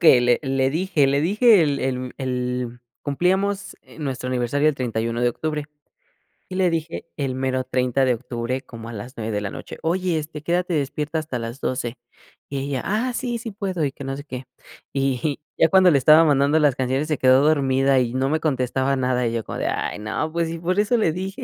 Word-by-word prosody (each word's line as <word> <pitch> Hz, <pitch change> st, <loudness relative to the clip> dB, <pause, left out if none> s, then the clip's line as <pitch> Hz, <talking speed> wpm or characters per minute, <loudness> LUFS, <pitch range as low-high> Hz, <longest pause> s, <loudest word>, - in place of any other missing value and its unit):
que 145 Hz, -7 st, +7 dB
le 120 Hz, 0 st, +3 dB
le 135 Hz, -1 st, +1 dB
dije 160 Hz, -2 st, +2 dB
le 140 Hz, +1 st, +2 dB
dije 205 Hz, +3 st, +5 dB
el 145 Hz, -2 st, 0 dB
el 130 Hz, -1 st, -2 dB
el 125 Hz, -2 st, -3 dB, 0.2 s
cumplíamos, 190 Hz, +7 st, 0 dB
eh, -, -, -17 dB
nuestro 130 Hz, -3 st, -3 dB
aniversario 130 Hz, +4 st, +1 dB
el 150 Hz, -, +1 dB
31, 115 Hz, -2 st, -2 dB
de 120 Hz, -, +4 dB
octubre 150 Hz, +2 st, -3 dB, 0.9 s
y 185 Hz, -, -6 dB
le 185 Hz, -1 st, +3 dB
dije 165 Hz, 0 st, -3 dB
el 135 Hz, -3 st, -2 dB
mero 130 Hz, 0 st, -1 dB
30 130 Hz, +1 st, +1 dB
de 125 Hz, -, +3 dB
octubre 120 Hz, +2 st, -4 dB
como 115 Hz, -1 st, -10 dB
a 120 Hz, -, -7 dB
las 120 Hz, +6 st, -8 dB
9 110 Hz, 0 st, -3 dB
de 105 Hz, -, 0 dB
la 100 Hz, -, -3 dB
noche. -, -, -8 dB
Oye, 175 Hz, 0 st, 0 dB
este, 150 Hz, 0 st, -7 dB
quédate 175 Hz, +1 st, 0 dB
despierta 150 Hz, +2 st, -1 dB
hasta 155 Hz, -5 st, -4 dB
las 115 Hz, +3 st, -6 dB
12. 125 Hz, -1 st, -2 dB, 0.5 s
Y 140 Hz, -, -3 dB
ella: 135 Hz, -1 st, -2 dB
"Ah, 230 Hz, +5 st, 0 dB
sí 240 Hz, -1 st, -2 dB
sí 230 Hz, 0 st, -6 dB
puedo", 190 Hz, -6 st, -2 dB
y 135 Hz, -, -1 dB
que 140 Hz, -, -10 dB
no 135 Hz, 0 st, -3 dB
sé 145 Hz, -, -7 dB
qué. 130 Hz, -2 st, -7 dB, 0.5 s
Y 135 Hz, +1 st, 0 dB, 0.2 s
ya -, -, +5 dB
cuando 185 Hz, 0 st, +6 dB
le 140 Hz, -, +5 dB
estaba 155 Hz, +4 st, +7 dB
mandando 145 Hz, +1 st, +3 dB
las 145 Hz, -4 st, +3 dB
canciones 130 Hz, +3 st, -1 dB
se 155 Hz, -, +1 dB
quedó 130 Hz, +2 st, +5 dB
dormida 135 Hz, -3 st, +3 dB
y 120 Hz, -1 st, 0 dB
no 130 Hz, +1 st, 0 dB
me 155 Hz, -, +1 dB
contestaba 130 Hz, -2 st, 0 dB
nada, 125 Hz, -2 st, +1 dB
y 115 Hz, -, -2 dB
yo 115 Hz, -2 st, -2 dB
como -, -, -5 dB
de, -, -, -1 dB
ay -, -, -2 dB
no, 110 Hz, +9 st, -2 dB
pues, 165 Hz, -1 st, -1 dB
si 165 Hz, -, -5 dB
por 185 Hz, +4 st, 0 dB
eso 215 Hz, +4 st, +3 dB
le 190 Hz, -8 st, +2 dB
dije. 190 Hz, +2 st, -5 dB
140 Hz, 220 wpm, -23 LUFS, 125-160 Hz, 0.9 s, que